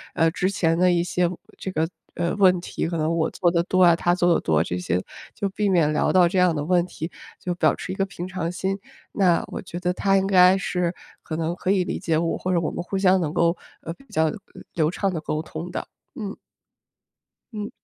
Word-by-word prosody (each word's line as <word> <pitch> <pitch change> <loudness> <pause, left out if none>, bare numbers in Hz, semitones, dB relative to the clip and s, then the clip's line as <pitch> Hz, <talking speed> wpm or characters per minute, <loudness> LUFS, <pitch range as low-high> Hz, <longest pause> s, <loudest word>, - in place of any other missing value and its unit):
呃， 165 0 +4
之 185 +2 0
前 165 -4 +1
的 180 +1 +4
一 175 -1 +2
些 175 0 0 0.3
这 190 - -5
个， 160 -1 0 0.3
呃， 175 +2 -1
问 185 -3 +4
题， 170 - -3
可 170 - -2
能 160 +2 0
我 160 -1 +1
做 175 - +1
得 170 0 +1
多 185 +1 +1
啊， 170 -1 +6
他 175 +1 +1
做 175 -1 +3
得 - - +2
多， 80 -1 +2
这 90 - -2
些， 90 0 -1 0.3
就 200 - -2
避 205 +1 0
免 160 -5 +3
聊 - - +2
到 180 -2 +5
这 185 +2 -2
样 180 -2 +4
的 145 -2 -3
问 175 +1 +3
题， 165 -1 -6 0.3
就 180 -1 -3
保持 185 - 0
一 - - -6
个 195 - 0
平 180 -2 -7
常 180 -3 -3
心。 190 +2 -2 0.4
那 180 -4 +3
我 - - -6
觉 175 - -7
得 180 0 0
他 195 +1 +2
应 190 - +1
该 185 -1 +6
是 180 -2 -1 0.3
可 155 - -4
能 165 +1 -1
可 185 - -1
以 185 -3 +2
理 - - -3
解 160 -1 0
我， 165 0 0
或 185 - -2
者 175 - +3
我 160 - -1
们 175 - -5
互 195 +2 -3
相 190 -1 +4
能 155 -1 -2
够， 170 0 +2 0.3
呃， 165 - -5
比 275 - -20
较 160 0 +2 0.4
流 155 -1 +1
畅 195 +1 -1
地 160 - -3
沟 155 0 -2
通 160 +2 -7
的。 - - -4 0.3
嗯。 210 -6 -5 1.2
嗯。 210 -1 -4
175 Hz, 255 characters per minute, -24 LUFS, 165-185 Hz, 1.2 s, 啊